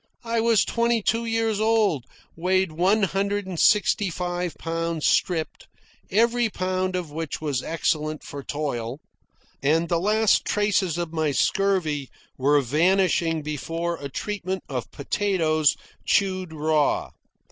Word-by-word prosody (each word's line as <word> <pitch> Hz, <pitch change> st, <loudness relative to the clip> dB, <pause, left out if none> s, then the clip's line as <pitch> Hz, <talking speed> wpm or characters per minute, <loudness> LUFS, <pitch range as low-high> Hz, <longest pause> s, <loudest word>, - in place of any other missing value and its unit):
I 230 Hz, 0 st, -1 dB
was 225 Hz, -3 st, +3 dB
twenty 235 Hz, -1 st, +1 dB
two 230 Hz, +2 st, +1 dB
years 225 Hz, -2 st, 0 dB
old, 215 Hz, -, +2 dB, 0.3 s
weighed 185 Hz, +1 st, +1 dB
one 190 Hz, +7 st, +2 dB
hundred 200 Hz, +1 st, 0 dB
and 185 Hz, -3 st, -5 dB
sixty 205 Hz, -1 st, +3 dB
five 175 Hz, 0 st, -3 dB
pounds 165 Hz, -1 st, -2 dB
stripped, 165 Hz, -3 st, 0 dB, 0.4 s
every 235 Hz, +2 st, +2 dB
pound 185 Hz, -1 st, -2 dB
of 175 Hz, -4 st, -3 dB
which 160 Hz, 0 st, -4 dB
was 145 Hz, -5 st, -1 dB
excellent 155 Hz, -1 st, -1 dB
for 145 Hz, -, -7 dB
toil; 135 Hz, -4 st, -4 dB, 0.6 s
and 160 Hz, +4 st, +2 dB
the 170 Hz, -, +2 dB
last 215 Hz, +3 st, +3 dB
traces 200 Hz, -5 st, +1 dB
of 170 Hz, -2 st, -3 dB
my 160 Hz, -2 st, +1 dB
scurvy 160 Hz, -5 st, +1 dB, 0.3 s
were 145 Hz, +2 st, +3 dB
vanishing 165 Hz, +3 st, +2 dB
before 165 Hz, +3 st, -3 dB
a 140 Hz, -2 st, -6 dB
treatment 190 Hz, +3 st, -4 dB
of 125 Hz, -4 st, -4 dB
potatoes 155 Hz, -2 st, +1 dB, 0.3 s
chewed 185 Hz, -3 st, +1 dB
raw. 155 Hz, -1 st, +1 dB
175 Hz, 130 wpm, -24 LUFS, 155-200 Hz, 0.6 s, was